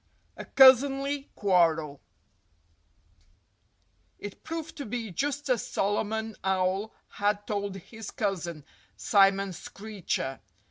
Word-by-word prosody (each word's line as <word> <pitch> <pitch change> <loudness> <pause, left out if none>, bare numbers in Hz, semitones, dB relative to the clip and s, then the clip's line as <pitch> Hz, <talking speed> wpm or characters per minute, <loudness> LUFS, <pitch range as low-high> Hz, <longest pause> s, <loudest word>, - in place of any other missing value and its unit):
XVIII - - -40
A - - -8
Cousinly 275 +2 +5
Quarrel 165 -7 +2 2.2
It 205 -1 -9
proved 325 0 -6
to 285 - -5
be 225 -2 -4
just 285 - -2
as 250 -4 +1
Solomon 220 +2 -1
Owl 190 +2 0 0.2
had 205 0 -1
told 200 -2 -3
his 220 +3 -9
cousin, 170 -7 -3 0.3
Simon 195 - +3
Screecher. 195 -7 -4
205 Hz, 100 wpm, -28 LUFS, 190-245 Hz, 2.2 s, Cousinly